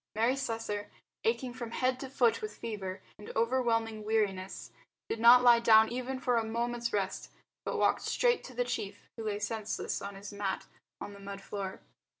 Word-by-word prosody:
_ - - -2
Mary 240 +4 +3
Slessor, 225 -5 -3 0.4
aching 270 - 0
from 240 -2 -6
head 255 +2 0
to 270 - -6
foot 245 -3 +2
with 430 0 -6
fever 195 -4 -5 0.2
and 210 - -8
overwhelming 225 -2 +1
weariness, 200 -3 -1 0.4
did 225 - -3
not 240 +2 +8
lie 240 -1 +8
down 220 -1 +6
even 255 +2 -3
for 250 -1 +2
a 230 - +2
moment's 235 +1 -2
rest, 190 -2 -2 0.4
but - - -1
walked - - +3
straight 485 -1 +2
to 255 - -10
the 245 +1 +1
chief 205 -4 -4
who 225 - -6
lay 210 -1 -1
senseless 215 +1 -3
on 200 0 -6
his 200 +1 -8
mat 200 -2 -2 0.3
on 205 - -7
the 200 - -12
mud 200 0 -7
floor. 195 -1 -5
225 Hz, 185 wpm, -31 LUFS, 205-245 Hz, 0.4 s, not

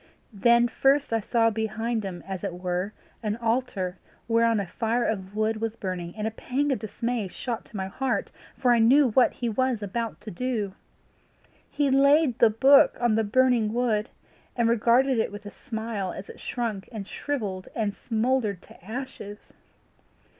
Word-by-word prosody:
Then 235 +4 +4
first 275 +2 +2
I 225 - +3
saw 225 +1 +2
behind 220 +1 -2
him 185 -3 -6
as 190 -2 -5
it 175 - -3
were 180 +2 -2 0.3
an 210 -2 -1
altar 225 -6 -1 0.3
whereon 230 -1 +3
a 200 - -2
fire 230 +6 -1
of 195 -2 -3
wood 215 0 0
was 225 -1 -2
burning, 180 -5 -5
and 215 -1 -3
a 220 - -1
pang 275 +6 -1
of 265 - 0
dismay 230 0 -3
shot 230 +4 -5
to 215 - -9
my 190 - -2
heart, 255 +7 -2 0.3
for 250 -2 +3
I 235 - +3
knew 255 +3 +5
what 250 +3 +4
he 240 - -4
was 235 0 0
about 225 +3 -3
to 215 - -8
do. 215 -1 -2 1.0
He 285 -2 +1
laid 280 -1 +4
the 230 - +7
book 270 +6 +5
on 240 -2 +2
the 220 +1 +2
burning 230 0 +2
wood, 235 -2 0 0.5
and 235 -2 +2
regarded 240 +3 +3
it 220 - 0
with 205 0 -9
a 205 - -7
smile 220 -6 -4
as 190 - -8
it - - -16
shrunk 225 -6 -4
and 210 -4 -6
shrivelled 210 -12 -4
and 210 -3 -1
smouldered 225 -3 -1
to - - -17
ashes. 220 -2 -6
225 Hz, 175 wpm, -26 LUFS, 205-245 Hz, 1.0 s, the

